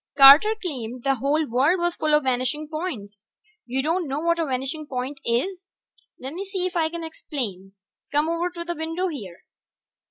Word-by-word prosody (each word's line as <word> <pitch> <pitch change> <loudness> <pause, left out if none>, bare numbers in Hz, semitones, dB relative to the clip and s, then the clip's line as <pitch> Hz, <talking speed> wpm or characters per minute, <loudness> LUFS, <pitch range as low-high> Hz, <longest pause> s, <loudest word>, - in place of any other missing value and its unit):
Carter 285 +11 +9
claimed 250 - -5
the 275 -1 +2
whole 290 +5 +1
world 270 +10 +3
was 345 -1 0
full 305 -1 +2
of 300 - +2
vanishing 260 +4 -1
points. 250 - -5 0.4
You 260 +2 0
don't 330 +2 0
know 275 +2 -2
what 335 +1 +1
a 325 - 0
vanishing 270 +4 -2
point 265 +2 -4
is? 350 +11 -1 0.6
Lemme 295 +9 -5
see 380 -2 -2
if 365 0 -3
I 320 -2 +2
can 335 0 -6
explain. 225 - -5 0.4
Come 295 +2 +2
over 335 +2 0
to 340 -1 -7
the 345 - -2
window 325 +4 -2
here. 200 - -8
300 Hz, 180 wpm, -24 LUFS, 255-340 Hz, 0.6 s, Carter